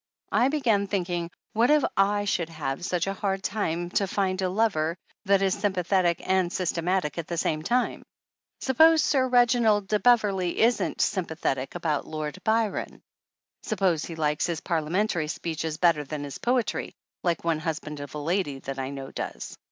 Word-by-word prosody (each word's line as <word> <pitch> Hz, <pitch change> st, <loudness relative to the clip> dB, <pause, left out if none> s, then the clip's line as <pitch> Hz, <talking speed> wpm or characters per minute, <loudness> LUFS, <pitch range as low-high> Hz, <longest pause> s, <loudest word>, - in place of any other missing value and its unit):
I 245 Hz, -, +4 dB
began 235 Hz, -9 st, +1 dB
thinking: 175 Hz, -3 st, -2 dB, 0.2 s
What 230 Hz, +3 st, +3 dB
if 300 Hz, -1 st, +5 dB, 0.3 s
/ 205 Hz, 0 st, -1 dB
should 170 Hz, -4 st, 0 dB
have 155 Hz, -2 st, -4 dB
such 180 Hz, -1 st, 0 dB
a 195 Hz, -, -2 dB
hard 195 Hz, -1 st, -2 dB
time 175 Hz, -4 st, -2 dB
to 195 Hz, -, +1 dB
find 190 Hz, -1 st, -1 dB
a 185 Hz, -, +1 dB
lover 180 Hz, -5 st, +1 dB, 0.3 s
that 195 Hz, 0 st, +3 dB
is 190 Hz, -1 st, +2 dB
sympa 195 Hz, -3 st, -1 dB
thetic 175 Hz, -3 st, +2 dB
and 185 Hz, -2 st, +2 dB
systematic 175 Hz, -2 st, -1 dB
at 165 Hz, -, -5 dB
the 170 Hz, -, -3 dB
same 155 Hz, -1 st, 0 dB
time? 245 Hz, +9 st, 0 dB, 0.6 s
Sup 265 Hz, -2 st, -2 dB
pose 320 Hz, -1 st, +7 dB
Sir 260 Hz, -3 st, +2 dB
Reginald 235 Hz, -5 st, +3 dB
de 210 Hz, +1 st, +1 dB
Beverley 200 Hz, -6 st, +2 dB
isn't 235 Hz, +2 st, +2 dB
sympathetic 160 Hz, -8 st, -1 dB
about 160 Hz, -4 st, -1 dB
Lord 155 Hz, -2 st, -5 dB
Byron! 220 Hz, -1 st, -1 dB, 0.6 s
Suppose 185 Hz, -7 st, 0 dB
he 165 Hz, -, -6 dB
likes 150 Hz, -2 st, 0 dB
his 170 Hz, -2 st, -3 dB
par 170 Hz, -3 st, 0 dB
liamentary 170 Hz, 0 st, 0 dB
speeches 160 Hz, -1 st, -3 dB
better 165 Hz, -3 st, +3 dB
than 145 Hz, +1 st, -5 dB
his 140 Hz, -2 st, -7 dB
poetry, 245 Hz, -3 st, -1 dB, 0.3 s
like 170 Hz, -2 st, 0 dB
one 165 Hz, -2 st, +1 dB
husband 155 Hz, -2 st, -4 dB
of 145 Hz, 0 st, -8 dB
a -, -, -3 dB
lady 155 Hz, -1 st, -1 dB
that 135 Hz, 0 st, -5 dB
I 130 Hz, 0 st, -3 dB
know 135 Hz, -1 st, -7 dB
does -, -, -6 dB
180 Hz, 175 wpm, -26 LUFS, 160-205 Hz, 0.6 s, pose